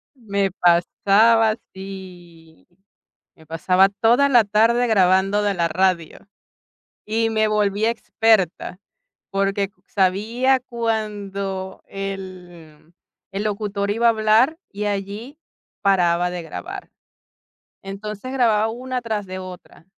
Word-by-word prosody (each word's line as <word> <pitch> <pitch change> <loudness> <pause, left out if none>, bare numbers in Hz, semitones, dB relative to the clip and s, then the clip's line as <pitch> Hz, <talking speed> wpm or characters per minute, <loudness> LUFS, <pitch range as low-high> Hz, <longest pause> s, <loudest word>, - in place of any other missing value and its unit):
Me 200 -5 -1
pasaba, 205 +6 +3 0.2
sí, 180 -4 -12 0.7
me 160 - -19
pasaba 180 +5 +3
toda 235 +7 +3
la 245 -4 +6
tarde 225 +4 +2
grabando 195 0 +3
de 205 -1 +1
la 170 -1 +1
radio 180 +1 -1 0.8
y 225 +1 0
me 220 -1 +2
volví 210 0 0
experta 220 -6 +1 0.5
porque 195 0 0 0.2
sabía 225 +8 +1
cuándo 205 -5 -4
el 180 -5 -9 0.4
el 195 +2 -3
locutor 205 -1 -2
iba 230 +3 +1
a - - +7
hablar 225 +7 +3
y 210 +1 -4
allí 205 +8 -5 0.4
paraba 180 -2 +2
de 175 -1 -5
grabar. 145 - -8 0.9
Entonces, 210 +5 -7
grababa 225 -5 +2
una 250 +2 -4
tras 215 -4 -3
de 185 0 -6
otra. 185 -3 -11
200 Hz, 110 wpm, -21 LUFS, 185-225 Hz, 0.9 s, a